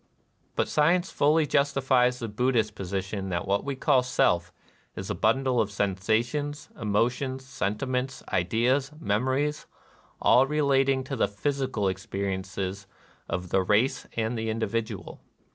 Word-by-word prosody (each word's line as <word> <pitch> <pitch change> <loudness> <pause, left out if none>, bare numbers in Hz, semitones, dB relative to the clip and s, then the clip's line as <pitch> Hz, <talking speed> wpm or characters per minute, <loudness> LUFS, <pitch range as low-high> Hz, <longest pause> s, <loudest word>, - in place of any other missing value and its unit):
But - - +1
science 175 +5 +2
fully 150 +2 +3
justifies 135 -3 +2
the 115 - -4
Bud 125 +5 0
dhist 110 -2 +1
position 95 0 -4
that 85 -1 -2
what 100 +1 +1
we 140 -1 -3
call 130 0 +3
Self 90 -8 +1 0.4
is - - -5
a - - 0
bundle 125 +2 +2
of 105 - -1
sensations, 110 +9 -1
emotions, 125 +5 -1
sentiments, 130 +2 -2
ideas, 120 +10 +1
memories, 130 +5 0 0.5
all 130 +2 +5
relating 135 -2 +2
to 135 +1 -4
the 115 - +2
'physical 130 -1 -1
experiences 95 +1 -3 0.4
of 90 +1 -3
the 95 - +3
race 105 +7 +1
and 110 +1 0
the 110 -1 -2
individual. 110 -1 -3
120 Hz, 130 wpm, -27 LUFS, 100-135 Hz, 0.5 s, all